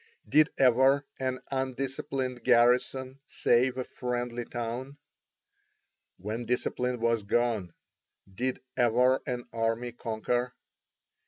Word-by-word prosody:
Did 155 0 +5
ever 135 +2 +4
an 130 -1 -2
undisciplined 130 -1 -3
garrison 125 +2 +3
save 125 +2 +2
a 130 - -1
friendly 120 -1 -3
town? 120 +4 -5 1.2
When 110 +5 -4
discipline 125 0 -1
was 115 -1 +1
gone, 105 -4 0 0.6
did 125 +6 -2
ever 125 +1 +3
an 125 -2 -3
army 115 +1 -1
conquer? 120 +2 -2
125 Hz, 95 wpm, -29 LUFS, 120-130 Hz, 1.2 s, Did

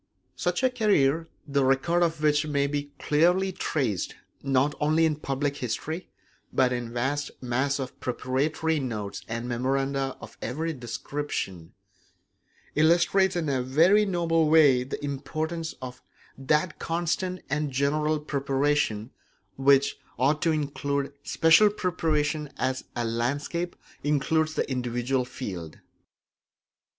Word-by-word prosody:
Such 175 +6 -1
a 260 - +4
career, 165 - +2 0.2
the 140 -1 +1
record 135 +7 +2
of 165 -2 0
which 150 0 +3
may 140 -1 +1
be 145 0 -3
clearly 180 +5 +2
traced 130 - -2 0.3
not 135 +1 +2
only 155 +2 +3
in 155 -2 +1
public 140 0 -2
history 155 +8 -4 0.4
but 125 -1 +3
in 120 -1 -3
a - - -10
vast 135 +5 -1
mass 130 +3 0
of 130 -2 -6
preparatory 150 +6 -1
notes 110 -7 -4
and 115 +1 -4
memoranda 135 +2 -1
of - - -12
every 160 +8 -2
description, 120 - -5 1.0
illustrates 175 +4 +3
in 170 -3 -1
a 135 -3 +1
very 165 +11 +4
noble 165 -4 +2
way 145 -6 +6
the 135 +2 -5
importance 155 +4 -3
of 125 0 -7 0.3
that 150 +5 0
constant 175 +2 -1
and 150 +1 -1
general 150 +3 +1
preparation 140 -5 0 0.4
which 140 0 +3 0.2
ought 145 +5 +2
to 165 - +3
include 140 -2 -2
special 165 +9 +5
preparation 155 -6 -1
as 130 0 -1
a 120 -1 -1
landscape 140 +9 -2 0.3
includes 155 +2 +1
the - - 0
individual 125 0 -1
field. 95 -11 -7
145 Hz, 125 wpm, -27 LUFS, 130-160 Hz, 1.0 s, way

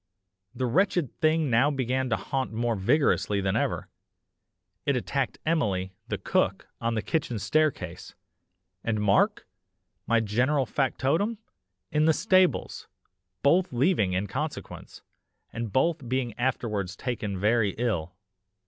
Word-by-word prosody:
The 130 - -1
wretched 175 - +1
thing 155 -3 +2
now 120 +5 +4
began 130 -2 -1
to 115 - +2
haunt 135 -1 -3
more 115 +1 0
vigorously 105 -1 +2
than 95 -1 0
ever. - - -1 1.0
It 140 - +1
attacked 130 +1 -1
Emily, 100 - 0
the - - -2
cook, - - 0
on 115 0 0
the 110 - -1
kitchen 145 -8 -1
staircase, 155 +7 -1 0.7
and 110 -2 0
Mark, 105 -1 +2 0.6
my 115 - +4
general 125 +6 +1
factotum, 145 - 0 0.5
in 150 0 +3
the 160 - +5
stables, 185 0 +2 0.6
both 175 +7 +3
leaving 125 - +2
in 95 +3 0
consequence, 145 +9 -6 0.5
and 115 -2 -4
both 140 - +1
being 130 -3 -1
afterwards 105 -7 -1
taken 105 -5 -3
very 105 0 +2
ill. 90 -8 -1
125 Hz, 125 wpm, -27 LUFS, 110-150 Hz, 1.0 s, the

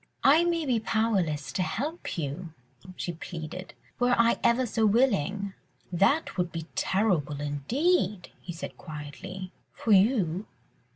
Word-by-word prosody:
"I 300 +5 +7
may 340 -2 +1
be 250 -4 +2
powerless 200 -10 0
to 190 - -1
help 290 - -3
you," 160 +2 -4 0.4
she 175 - -3
pleaded, 165 +2 -7 0.2
"were 245 0 +4
I 230 0 +4
ever 245 +2 +4
so 225 -1 0
willing." 205 - +2 0.4
"That 200 - +2
would 180 -1 0
be 165 -1 -5
terrible 175 -8 +1
indeed," 195 - 0
he 175 - -6
said 165 - -7
quietly, 180 +5 -7 0.2
"for 225 - -2
you 195 -3 +3
195 Hz, 130 wpm, -28 LUFS, 165-235 Hz, 0.4 s, I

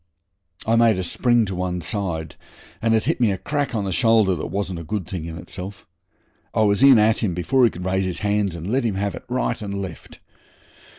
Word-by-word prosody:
I 115 - +2
made 115 -3 +4
a 95 - -2
spring 120 +6 +2
to 95 - -4
one 90 0 -2
side, 85 -4 -3 0.5
and 115 0 +3
it 110 - +2
hit - - -1
me 115 - +4
a 95 - -1
crack 145 +3 -2
on 105 - 0
the 95 - -2
shoulder 110 -1 +4
that 80 - -4
wasn't 95 -3 -3
a - - -6
good 100 +2 -3
thing 90 -3 -5
in 80 0 -6
itself. 95 +2 -8 0.7
I 110 - +4
was 100 +1 +2
in 135 -2 +8
at 110 +1 +3
him 95 -6 -1
before 125 +9 +3
he - - +4
could 90 -2 -8
raise 95 +1 0
his 90 -2 -2
hands, 100 -3 +1
and 85 -1 -7
let 125 +7 0
him 110 -4 -1
have 100 +1 -1
it - - -9
right 125 -2 -1
and 100 -1 -4
left. 95 -5 -8
100 Hz, 230 wpm, -22 LUFS, 90-115 Hz, 0.7 s, in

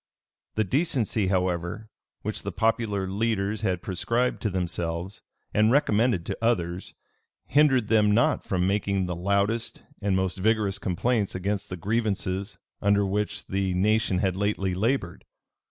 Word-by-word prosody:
The 110 - +2
decency, 115 - +1
however, 90 +2 -1 0.4
which - - -3
the - - -4
popular 110 -4 0
leaders 105 +1 -1
had 95 -5 -1
prescribed 115 +7 -1
to 110 - 0
themselves, 90 0 -3 0.3
and 110 +1 +4
recommended 115 - +2
to - - -3
others, 90 -6 -1 0.5
hindered 135 -6 +3
them 105 -1 +4
not 115 +3 +3
from 90 -1 0
making 100 -1 0
the 90 -1 -3
loudest 100 +6 -1 0.2
and 100 -2 +1
most 95 0 -1
vigorous 105 -1 +1
complaints 100 +3 0
against 100 +2 -2
the 90 - -5
grievances 100 -1 -2 0.2
under 100 0 +3
which 105 +2 -2
the 95 -1 -1
nation 105 +1 +2
had 95 -1 +1
lately 95 -1 0
labored. 105 -1 -1
100 Hz, 140 wpm, -26 LUFS, 95-110 Hz, 0.5 s, and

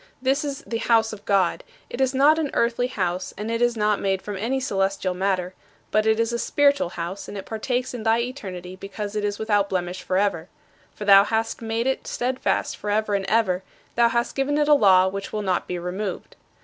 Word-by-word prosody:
This 270 +3 +1
is 280 -2 -4
"the 230 - -3
house 225 -1 +2
of 205 - -10
God." 195 -4 +1 0.2
It 255 - -5
is 260 -1 +3
not 295 +4 +5
an 300 -3 -1
earthly 235 +1 +1
house 185 -6 -3
and 210 +3 -4
it 230 +1 -1
is 240 -1 +2
not 210 -1 +2
made 195 -1 0
from 205 - -5
any 235 +7 -1
celestial 195 -5 -1
matter; 185 -1 -1 0.4
but 215 0 +2
it 220 0 +3
is 230 +1 +1
a 235 - -1
spiritual 285 -7 +2
house, 175 +4 -5
and 205 - -7
it 195 - -6
partakes 245 +3 -2
in 245 - -5
thy 225 +1 +2
eternity 190 -8 -6
because 200 +2 -6
it 210 - -1
is 205 0 -1
without 205 -2 +1
blemish 180 0 -2
forever. 185 -2 0 0.5
For 210 - -6
thou 200 -1 +8
hast 225 +2 -2
made 225 +1 -2
it 265 0 -1
steadfast 255 +1 -1
forever 210 0 -1
and 195 -1 0
ever; 195 -4 +2 0.3
thou 235 0 +4
hast 235 +1 -1
given 275 +2 0
it 295 -1 +2
a 300 - +6
law 190 -8 +6
which 195 +1 -5
will 210 -1 -3
not 185 -2 0
be 180 - -3
removed. 180 +3 -5
210 Hz, 215 wpm, -24 LUFS, 195-240 Hz, 0.5 s, thou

